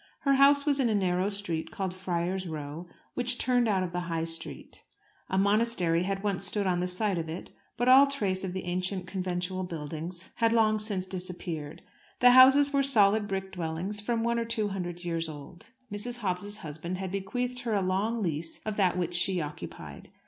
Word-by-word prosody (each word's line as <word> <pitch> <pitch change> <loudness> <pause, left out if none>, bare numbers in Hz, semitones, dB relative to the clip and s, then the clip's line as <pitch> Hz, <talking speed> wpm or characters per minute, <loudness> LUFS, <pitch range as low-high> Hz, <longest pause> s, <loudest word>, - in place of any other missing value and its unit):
Her 275 - +3
house 280 +1 +5
was 285 -2 +2
in 250 -3 +2
a 215 - +1
narrow 185 0 +1
street, 200 -6 -3
called 190 -2 -4
Friar's 185 0 -2
Row, 155 +2 -6 0.3
which 245 0 -1
turned 245 -2 +2
out 195 -3 +1
of 180 - -4
the 180 0 -4
High 165 -1 -1
Street. 165 0 -7 0.5
A 190 - 0
monastery 200 -4 +3
had 195 +2 -2
once 200 -3 -1
stood 200 +1 -1
on 180 -2 +1
the 180 - 0
site 185 0 0
of 160 -1 -4
it, 165 +3 -7 0.3
but 245 +1 0
all 265 +2 +8
trace 200 -9 -1
of 190 - -3
the 190 - -4
ancient 180 +1 -2
conventual 185 0 -3
buildings 170 +1 -6
had 230 0 +3
long 215 -2 +3
since 205 -3 -2
disappeared. 180 -5 -6 0.4
The 245 0 +7
houses 270 +3 +7
were 280 - +3
solid 215 -6 +4
brick 190 -1 -3
dwellings, 175 +4 -2
from 225 +2 -1
one 235 0 +1
to 230 - -1
two 225 -3 0
hundred 175 -2 -5
years 165 -1 -2
old. 150 +3 -11 0.2
Mrs. 235 +3 -3
Dobbs's 200 +2 -2
husband 165 +1 -6
had 190 -1 -4
bequeathed 245 +6 -3
her 235 -3 -1
a 200 - +2
long 205 +5 0
lease 165 -1 -2
of 215 -1 -3
that 185 -3 +2
which 175 -1 -1
she 175 +1 +3
occupied. 150 -2 -8
190 Hz, 195 wpm, -29 LUFS, 175-220 Hz, 0.5 s, all